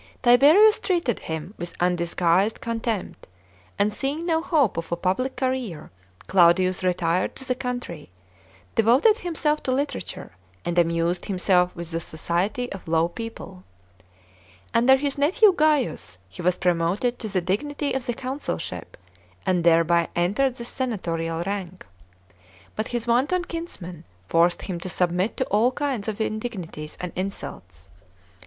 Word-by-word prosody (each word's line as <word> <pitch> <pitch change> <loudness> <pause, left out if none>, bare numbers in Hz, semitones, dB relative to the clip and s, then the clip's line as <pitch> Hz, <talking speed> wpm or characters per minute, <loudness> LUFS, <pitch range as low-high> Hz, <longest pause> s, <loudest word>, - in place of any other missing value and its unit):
Tiberius 300 - +7
treated 340 - 0
him 160 +4 -6
with 175 0 -5
undisguised 175 +3 +1
con 230 0 -3
tempt, 225 -4 -4 0.5
and 205 +1 +1
seeing 285 +8 -3
no 325 -2 +1
hope 295 - +2
of 165 0 -5
a - - +2
public 190 +10 -1
career, 255 - -3 0.3
Claudius 185 0 +4
retired 180 -1 0
to 265 - -7
the 255 - +2
country, 245 - -5 0.6
devoted 260 - +4
himself 310 -3 -1
to 260 - -2
literature, 280 +3 -3 0.3
and 175 0 +1
amused 170 +1 +1
himself 180 -2 +2
with 170 -1 -6
the 165 - -1
society 175 +10 -2
of 195 - -8
low 165 +1 +2
people. 190 -2 -8 1.1
Under 245 +3 +6
his 280 +1 -2
nephew 380 +8 +5
Gaius 295 - +1
he 95 - -10
was 180 +1 +1
promoted 180 +8 0
to 220 - -4
the 195 -3 0
dignity 285 - -2
of 265 -1 -3
the 240 - -1
consulship, 265 +4 -5 0.5
and 185 -3 +1
thereby 170 0 +4
entered 210 +10 +1
the 235 - -7
senatorial 170 -10 -2
rank. 190 -2 -5 0.9
But 215 - -2
his 240 -2 -2
wanton 275 +10 +1
kinsman 190 - -7 0.2
forced 170 - +2
him 180 -3 -4
to 185 - -6
submit 180 +3 0
to 260 - 0
all 225 +4 +2
kinds 260 -6 -2
of 220 -1 -3
indignities 215 -9 -4
and 180 -1 -4
insults. 90 - -6
200 Hz, 140 wpm, -24 LUFS, 175-260 Hz, 1.1 s, Tiberius